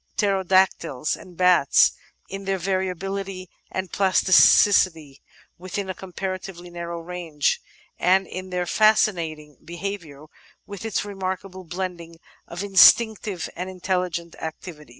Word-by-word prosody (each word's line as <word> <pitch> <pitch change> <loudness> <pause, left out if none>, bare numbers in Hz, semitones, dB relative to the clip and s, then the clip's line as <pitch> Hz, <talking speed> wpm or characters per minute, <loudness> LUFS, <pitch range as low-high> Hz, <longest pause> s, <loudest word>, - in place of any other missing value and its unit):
Pterodactyls, 190 - +1
and 180 -2 -15
bats; 180 -6 +5 0.4
in 195 +1 -7
their 195 0 0
variability 190 0 -3 0.2
and 190 -1 -4
plasticity 185 -5 +4 0.4
within 185 +1 -4
a - - -5
comparatively 185 -1 -7
narrow 170 0 -6
range; 165 -4 -2 0.4
and 190 +2 +3
in 185 +1 -7
their 180 -1 -2
fascinating 170 - +1
behaviour 170 -4 -7 0.4
with 200 0 -9
its 220 -2 -2
remarkable 190 -1 -5
blending 170 -1 -6 0.3
of 175 +3 -6
instinctive 205 -1 +4
and 180 +2 -5
intelligent 180 -2 -3
activities. 160 -2 -8
185 Hz, 110 wpm, -23 LUFS, 170-195 Hz, 0.4 s, bats